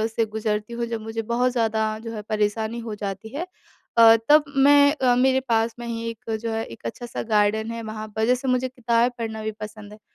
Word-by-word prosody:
से 230 - +2
गुज़रती 215 0 -3
हूँ, 235 0 -2
जब 230 -1 -4
मुझे 225 +1 -4
बहुत 235 +3 0
ज़्यादा 220 -2 0
जो 225 0 -7
है 210 - -5
परेशानी 220 +2 -1
हो 225 -2 -5
जाती 200 +1 -5
है 345 +5 -3 0.5
अ, 225 -1 +9
तब 300 0 +7
मैं 285 +1 +6
अ, 255 -4 +2
मेरे 260 +1 +3
पास 225 0 +1
में 240 - -6
ही 230 0 -3
एक 225 0 -7
जो 230 0 -3
है, 225 0 -1
एक 115 0 -13
अच्छा-सा 240 - -5
गार्डन 215 +2 +2
है 230 0 -5
वहाँ 215 0 -6
पर 220 0 +1
जैसे 250 +3 +1
मुझे 255 0 +1
किताबें 240 -1 +1
पढ़ना 220 -2 -4
भी 220 - -2
पसंद 215 -1 -8
है। 210 - -14
225 Hz, 220 wpm, -24 LUFS, 215-240 Hz, 0.5 s, अ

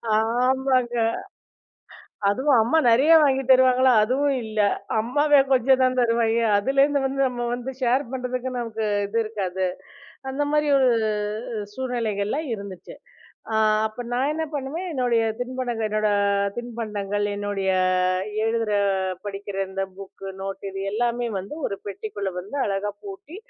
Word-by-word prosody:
ஆமாங்க. 250 +2 +1 1.3
அதுவும் 260 +6 +3
அம்மா 260 +9 +3
நிறைய 270 +8 +4
வாங்கித் 270 -2 +1
தருவாங்களா! 255 0 +5
அதுவும் 275 +4 +1
இல்ல. 215 0 -4 0.4
அம்மாவே 290 +6 +3
கொஞ்சம் 260 +1 +4
தான் 255 0 +1
தருவாங்க. 230 -1 +2 0.2
அதுலேருந்து 275 +5 +2
வந்து 270 +1 -1
நம்ம 240 -1 -3
வந்து 245 +2 -4
ஷேர் 255 +3 +2
பண்றதுக்கு 255 0 -3
நமக்கு 225 -2 -3 0.2
இது 220 +3 -3
இருக்காது. 190 -4 -3 0.6
அந்தமாரி 290 +2 0
ஒரு 260 -2 +4 0.7
அ - - -4
சூழ்நிலைகள்லாம் 240 +2 -2
இருந்துச்சு. 200 -4 -8 0.6
அ - - -1 0.3
அப்ப 220 +3 -7
நான் 260 +4 +1
என்ன 320 +1 -2
பண்ணுவேன்? 290 +6 -4
என்னுடைய 245 -4 +1 0.2
தின்பண்டங்கள் 245 -3 -2
என்னோட 215 0 +1 0.5
தின்பண்டங்கள், 210 -4 -3
என்னுடைய 205 -2 -1 0.7
எழுதுற, 225 -1 0 0.5
படிக்கிற 200 -1 -6
இந்த 195 0 -3 0.2
புக்கு 195 0 -9
நோட்டு 195 0 -6
இது 195 - -5
எல்லாமே 240 +2 0
வந்து 195 +9 -7
1 200 - -4
பெட்டிக்குள்ள 200 -1 -5
வந்து 205 +10 -8
அழகாக 200 +1 -2
பூட்டி 385 -3 -9
240 Hz, 125 wpm, -24 LUFS, 210-265 Hz, 1.3 s, தருவாங்களா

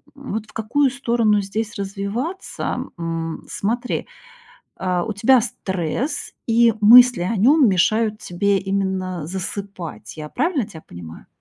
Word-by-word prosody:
М, 275 -5 -8
вот 220 0 -3
в - - -19
какую 260 +6 +1
сторону 235 -5 +1
здесь 215 +3 -4
развиваться, 200 - -4 0.2
м. 165 -1 -4
Смотри, 235 +4 -2 0.7
а, 180 -2 -1
у 220 - -3
тебя 235 +5 +4
стресс, 200 - -3
и 230 -1 +4
мысли 245 -1 +8
о 195 +6 -1
нем 260 +5 +5
мешают 215 +4 +2
тебе 195 +3 0
именно 190 -4 -2
засыпать, 180 - -6
я 150 -1 -7
правильно 285 - 0
тебя 160 -7 -12
понимаю? 85 -2 -11
205 Hz, 130 wpm, -21 LUFS, 185-235 Hz, 0.7 s, мысли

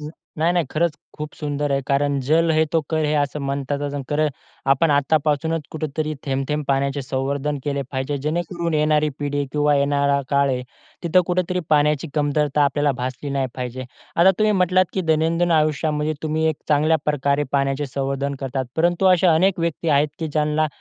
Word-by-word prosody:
नाही, 160 +2 -3
नाही. 175 -3 +2
खरंच 170 +1 +1 0.2
खूप 150 0 -6
सुंदर 145 -1 -3
आहे. 135 - +1
कारण 140 0 +1
जल 165 +2 +3
हे 155 0 +3
तो 165 - +3
कल 155 -1 +1
है 150 +1 +1
असं 145 +1 -4
म्हणतात. 140 0 -2 0.3
कल 150 +1 +1 0.4
आपण 150 +3 +3
आत्तापासूनच 150 +2 +1
कुठेतरी 155 0 -3
थेंब-थेंब 135 +2 -2
पाण्याचे 140 +1 0
संवर्धन 140 +2 -2
केले 140 -1 -1
पाहिजे, 130 +2 -2
जेणेकरून 170 +3 -2
येणारी 150 0 +2
पिढी 145 0 -2
आहे 140 - -1
किंवा 150 0 +2
येणारा 140 0 +2
काळ 140 -1 +3
आहे 125 -1 -1 0.4
तिथे 175 +1 +4
कुठेतरी 180 0 0
पाण्याची 150 +1 +2
कमतरता 150 -1 +1
आपल्याला 145 0 +1
भासली 130 +3 -4
नाही 135 -1 0
पाहिजे. 125 0 -5 0.3
आता 175 +3 +6
तुम्ही 215 0 +3
म्हटलात 185 -1 +3
की 190 - -1
दैनंदिन 165 +1 +1
आयुष्यामध्ये 155 0 +1
तुम्ही 155 0 -1
एक 155 - -1
चांगल्याप्रकारे 150 -2 +2
पाण्याचे 140 +1 0
संवर्धन 140 +1 -2
करतात. 135 0 -2
परंतु 175 +3 +2
अशा 180 -2 +5
अनेक 185 +3 +2
व्यक्ती 165 0 -2
आहेत 145 0 +3
की 160 -1 -3
ज्यांना 150 +1 +1
150 Hz, 165 wpm, -22 LUFS, 140-160 Hz, 0.4 s, आता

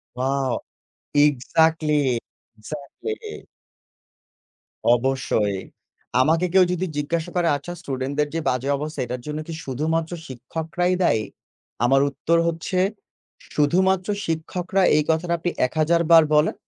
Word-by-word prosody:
Wow! 135 0 0 0.5
Exactly, 150 -1 +3 0.4
exactly 285 - -7 1.5
অবশ্যই। 120 -5 0 0.6
আমাকে 160 +6 +3
কেউ 190 0 +6
যদি 180 +1 -1
জিজ্ঞাসা 160 +3 -2
করে, 175 -1 +2
"আচ্ছা 145 +5 -7
student 130 0 -3
দের 150 0 +2
যে 165 - 0
বাজে 130 +2 -1
অবস্থা 150 +2 -5
এটার 125 +1 -5
জন্য 150 0 -3
কি 165 - -6
শুধুমাত্র 160 +5 -1 0.2
শিক্ষকরাই 160 +8 -2
দায়ী?" 110 -10 +2 0.6
আমার 135 +3 +4
উত্তর 170 +4 +1
হচ্ছে 170 +2 -2 0.8
শুধুমাত্র 185 +5 +2 0.2
শিক্ষকরা 180 +4 -1
এই 150 - +4
কথাটা 170 +2 +1
আপনি 175 +2 -1 0.2
১০০০ 160 +5 +1
বার 165 -1 +9
বলেন, 150 +1 +3
155 Hz, 115 wpm, -23 LUFS, 135-170 Hz, 1.5 s, বার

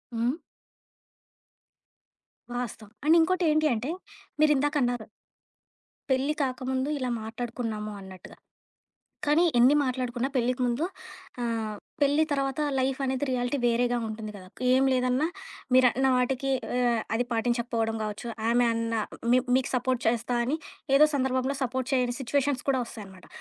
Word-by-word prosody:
హ్మ్. 235 +5 +1 2.2
వాస్తవం. 225 -3 -5
అండ్ 320 +2 +6
ఇంకోటి 365 +3 +2
ఏంటి 310 0 +3
అంటే, 235 +5 -3 0.5
మీరిందాకన్నారు? 285 -6 +2 1.0
పెళ్లి 265 +3 +2
కాకముందు 260 +1 -2
ఇలా 255 -1 -1
మాట్లాడుకున్నాము 225 -2 -4
అన్నట్టుగా. 190 -2 -12 0.9
కానీ 300 +4 +4
ఎన్ని 255 +5 +6
మాట్లాడుకున్నా 255 -1 -1
పెళ్లికి 250 +1 +1
ముందు 245 +6 0 0.6
ఆహ్, 225 -3 -2 0.2
పెళ్లి 290 +2 +4
తర్వాత 275 +1 -1 0.2
లైఫ్ 265 +1 0
అనేది 265 +1 0
రియాలిటీ 250 +2 0
వేరేగా 240 +1 +2
ఉంటుంది 215 -1 -6
కదా! 185 -1 -12 0.2
ఏం 265 +1 +4
లేదన్నా 255 +3 +2 0.5
మీరన్న 255 +1 +5
వాటికి 260 +2 0 0.2
ఆహ్, 240 -2 +2 0.2
అది 245 - +1
పాటించకపోవడం 230 -1 0
కావచ్చు. 215 +3 -5 0.2
ఆమె 240 +1 +4
అన్నా 230 -1 -1 0.3
మీ 255 - +6 0.2
మీకు 260 - 0
సపోర్ట్ 255 0 0
చేస్తా 240 +1 0
అని 295 +6 -1 0.4
ఏదో 305 - +7
సందర్భంలో 260 0 0
సపోర్ట్ 260 +1 -2
చేయని 245 -1 +1
సిట్యుయేషన్స్ 275 +1 0
కూడా 260 - +1
వస్తాయన్నమాట. 195 -5 -11
250 Hz, 125 wpm, -27 LUFS, 235-265 Hz, 2.2 s, ఏదో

